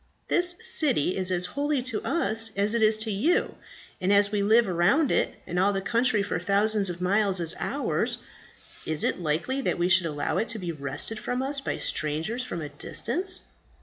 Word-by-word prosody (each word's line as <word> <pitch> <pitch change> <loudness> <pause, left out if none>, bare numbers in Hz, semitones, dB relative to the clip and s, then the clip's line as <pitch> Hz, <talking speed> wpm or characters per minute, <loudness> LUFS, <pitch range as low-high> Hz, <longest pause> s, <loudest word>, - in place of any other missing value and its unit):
This 355 0 +4
city 250 - +2
is 185 -1 -1
as 180 -1 0
holy 285 +6 -2
to 245 -4 -2
us 225 -9 +1
as 200 +2 +2
it 235 - 0
is 215 0 +4
to 220 - -3
you; 290 - +1 0.5
and 185 +2 +1
as 200 0 +4
we 205 -1 0
live 220 +3 +4
around 185 - +2
it, - - 0
and 175 +1 -3
all 195 +2 +3
the 195 - -1
country 230 +1 +1
for 180 - -3
thousands 200 +2 +2
of 175 0 -6
miles 195 0 +1
is 165 -2 +1
ours, - - -1 0.7
is 155 -1 0
it - - 0
likely 175 - -1
that - - -1
we 175 +1 0
should 185 -2 +5
allow 145 -2 -2
it 225 - -1
to 230 - -3
be 180 -4 -4
wrested 145 +8 -4
from 250 +3 -3
us 275 +1 0
by - - -3
strangers 160 - -2
from 170 -10 -5
a 150 - -6
distance?" 350 - -2
205 Hz, 200 wpm, -26 LUFS, 175-240 Hz, 0.7 s, should